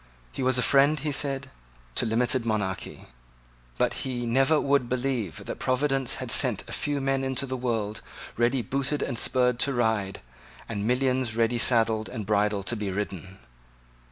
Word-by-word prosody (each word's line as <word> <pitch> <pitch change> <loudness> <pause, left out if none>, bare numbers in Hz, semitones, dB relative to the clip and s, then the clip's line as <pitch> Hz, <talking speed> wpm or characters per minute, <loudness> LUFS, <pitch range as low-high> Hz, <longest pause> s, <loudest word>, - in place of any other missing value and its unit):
He - - -6
was 130 0 +3
a 125 - +2
friend, 140 +2 +4
he 150 +1 -2
said, 135 -2 -1 0.4
to 120 - 0
limited 120 +3 +1
monarchy. 105 - -3 0.7
But - - +1
he 125 -2 -3
never 135 +6 +3
would 140 -3 +1
believe 125 -7 -2
that - - -6
Providence 135 0 +1
had - - -3
sent - - +2
a - - -9
few 145 -1 -1
men 135 0 0
into 135 0 -1
the 130 -1 -4
world 115 -4 -2 0.3
ready 120 +2 +1
booted 140 +5 -1
and 120 - -3
spurred 125 0 +2
to 140 - +2
ride, 110 -5 0 0.5
and 105 -2 -3
millions 130 -2 +1
ready 115 +1 +2
saddled 115 -2 +3
and 110 -5 -5
bridled 105 -1 +1
to 120 - 0
be 105 -2 -3
ridden. 95 -1 -5
125 Hz, 165 wpm, -26 LUFS, 110-135 Hz, 0.7 s, friend